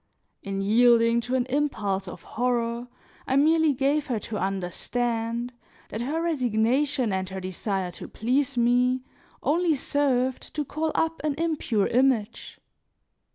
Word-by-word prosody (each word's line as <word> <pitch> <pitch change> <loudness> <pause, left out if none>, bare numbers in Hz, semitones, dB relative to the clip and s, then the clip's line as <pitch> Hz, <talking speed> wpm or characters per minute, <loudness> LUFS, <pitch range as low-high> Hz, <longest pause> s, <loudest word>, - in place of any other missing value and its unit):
In 195 -1 -3
yielding 230 +2 +4
to 250 +2 -2
an 250 -1 +1
impulse 245 -8 -1
of - - -9
horror, 235 0 -1 0.4
I 265 - +1
merely 315 +2 +4
gave 280 +2 +1
her 245 -4 -1
to 215 -3 -4
understand 230 +6 -2 0.4
that 220 - -4
her 305 +7 -1
resignation 255 - +1
and 190 0 -2
her 190 0 -5
desire 185 0 -3
to - - -9
please 255 +3 0
me 250 +2 +3 0.4
only 330 +1 +2
served 260 -2 0
to 300 -1 -1
call 310 +3 -2
up 325 0 0
an 300 -2 0
impure 300 -10 0
image. 240 -3 0
245 Hz, 135 wpm, -26 LUFS, 220-285 Hz, 0.4 s, yielding